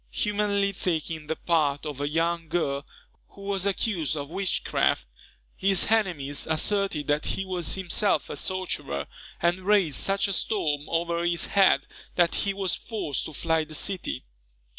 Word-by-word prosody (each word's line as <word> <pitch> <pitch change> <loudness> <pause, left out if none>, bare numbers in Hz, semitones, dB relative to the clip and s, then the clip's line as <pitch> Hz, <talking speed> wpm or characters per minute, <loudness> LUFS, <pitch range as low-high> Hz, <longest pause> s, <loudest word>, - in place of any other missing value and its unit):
Humanely 205 -1 0
taking 160 -4 -2
the 160 - -1
part 150 -4 +1
of 145 -2 -5
a 145 - 0
young 165 +1 0
girl 140 -5 -1 0.4
who 200 - -15
was 195 -1 0
accused 185 -6 0
of 145 +1 -5
witchcraft, 190 +1 +1 0.5
his 195 +1 +2
enemies 170 -11 +1
asserted 160 -1 +2
that 150 +1 0
he 195 - -2
was 180 -3 -1
himself 190 -2 +1
a - - -5
sorcerer, 145 - -1 0.4
and 175 +2 +3
raised 190 -7 +3
such 195 +1 +2
a 200 - -1
storm 150 -8 0
over 170 0 0
his 170 0 +1
head, 195 -1 +4 0.3
that 175 -2 +3
he 200 - 0
was 195 -2 0
forced 200 - -3
to 155 - -7
fly 160 +1 +1
the 155 0 -5
city. 185 +4 -1
170 Hz, 155 wpm, -27 LUFS, 155-195 Hz, 0.5 s, head